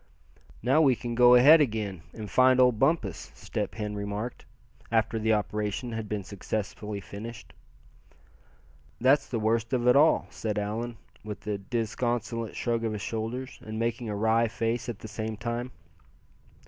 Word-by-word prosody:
"Now 135 +6 +4
we 135 -5 +5
can 120 0 -5
go 125 +1 +7
ahead 150 +6 +8
again, 105 - -1
and 110 -2 -7
find 130 +3 +4
old 125 -3 +4
Bumpus," 135 - 0
Step - - -4
Hen 105 -1 -3
remarked, 105 +3 -5 0.5
after 115 0 +1
the 110 0 +2
operation 105 +3 -2
had 110 -2 -5
been 105 -2 -2
successfully 105 +1 -4
finished. 110 +4 -9 1.5
"That's 130 +4 +4
the 120 - -1
worst 115 +2 0
of 125 -1 +1
it 125 - +6
all," 155 +3 +5
said 105 -2 -3
Allan, 110 +3 -3 0.3
with 105 -1 -7
a 105 -2 -2
disconsolate 115 +1 -2
shrug 115 -1 -1
of 110 -1 -1
his 105 -1 -5
shoulders, 115 +4 -4
and 110 0 -6
making 115 0 -2
a 105 - -2
wry 110 +2 +2
face 115 +2 -2
at 115 - -4
the 110 - -9
same 110 0 -4
time. 120 +2 -3
115 Hz, 160 wpm, -28 LUFS, 105-120 Hz, 1.5 s, ahead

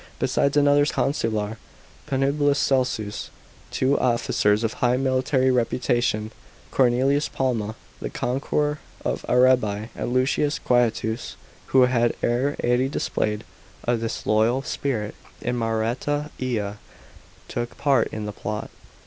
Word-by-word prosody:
Besides 140 +1 +1
another 145 0 +5
consular, 115 -6 -1 0.5
Pnblilius 140 +1 +2
Celsus, 125 -7 0 0.4
two 135 +2 +1
officers 115 -3 +2
of 115 - 0
high 125 0 +1
miliiary 130 0 +2
reputation, 120 -3 0 0.4
Cornelius 135 +3 +2
Palma, 115 -5 -1 0.2
the - - -4
conqueror 145 +4 -1 0.3
of - - -1
Arabi 125 -4 +3
i,and - - -4
Lusius 135 +4 +1
Quietus, 115 -2 0 0.3
who 130 -1 +5
had 120 -2 +2
air 130 +4 +1
ady 125 +2 +2
displayed 105 -6 -1 0.4
a 120 - +3
disloyal 115 +2 +1
spirit 115 -8 -2 0.3
in 125 - -2
Maureta 120 +6 -1
ia, 105 -5 -2 0.7
took 120 0 -4
part 135 -5 +3
in 110 -1 -5
the 105 - -5
plot. 105 0 -5
125 Hz, 115 wpm, -24 LUFS, 110-135 Hz, 0.7 s, another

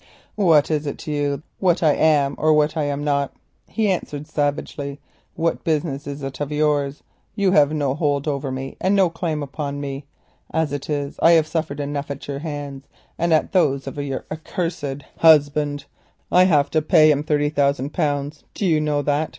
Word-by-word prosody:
"What 165 -8 +3
is 150 -1 -1
it 140 - -4
to 155 - -6
you 145 -1 -1 0.2
what 175 -2 +2
I 155 -2 +5
am 145 -3 +3
or 155 0 +4
what 150 +1 +2
I 155 -2 0
am 145 0 -2
not?" 140 -1 0 0.3
he 220 -2 0
answered 150 -5 -4
savagely. 145 -1 -3 0.4
"What 165 0 -1
business 150 -3 -1
is 140 0 -6
it 135 0 -6
of 145 0 -3
yours? 150 -2 0 0.3
You 200 -3 +2
have 150 -5 +5
no 145 -4 0
hold 145 -1 -1
over 140 -2 -2
me, 130 +1 -6
and 190 +2 +2
no 190 -4 +3
claim 165 -3 -3
upon 140 0 -5
me. 140 0 -6 0.4
As 160 -3 0
it 145 +1 -5
is 145 -1 -3
I 170 - +7
have 160 -2 +5
suffered 155 -2 -3
enough 145 0 -3
at 140 -1 -6
your 140 -1 -4
hands 145 -3 -6 0.3
and 170 0 +1
at 155 - +2
those 140 -8 +2
of 135 - -6
your 140 -2 -4
accursed 155 -3 -4 0.2
husband. 145 -2 +4 0.5
I 180 +1 +6
have 150 -6 +4
had - - -27
to 155 - +2
pay 155 0 +5
him 145 -1 +1
thirty 145 -1 +1
thousand 140 -1 0
pounds, 145 0 -2
do 205 - -2
you 160 -4 +3
know 150 -1 0
that? 145 +2 0
145 Hz, 195 wpm, -22 LUFS, 140-155 Hz, 0.5 s, I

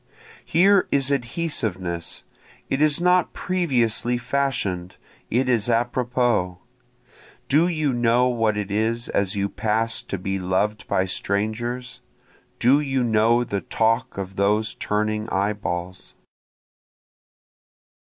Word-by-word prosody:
Here 195 +3 +4
is 140 0 +2
adhesiveness, 115 - -2 0.5
it 135 - 0
is 155 0 +3
not 180 0 +3
previously 125 - 0
fashion'd, 120 -10 -2 0.3
it 125 +3 +1
is 120 -3 +1
apropos; 120 -5 +1 0.9
Do 155 +5 +4
you 155 -6 0
know 120 +1 +3
what 115 -4 +1
it 105 -1 -3
is 115 +3 -1
as 100 -1 0
you 100 0 0
pass 110 +2 -1
to 100 - -5
be 95 +1 -3
loved 95 +4 -1
by 95 - +1
strangers? 110 +6 -3 0.6
Do 130 +4 +4
you 135 -3 0
know 115 +1 +3
the 100 -4 -3
talk 115 +5 0
of 95 0 -6
those 105 +2 +1
turning 105 +1 -2
eye 100 +2 0
balls? 90 -2 -5
115 Hz, 115 wpm, -23 LUFS, 100-125 Hz, 0.9 s, Here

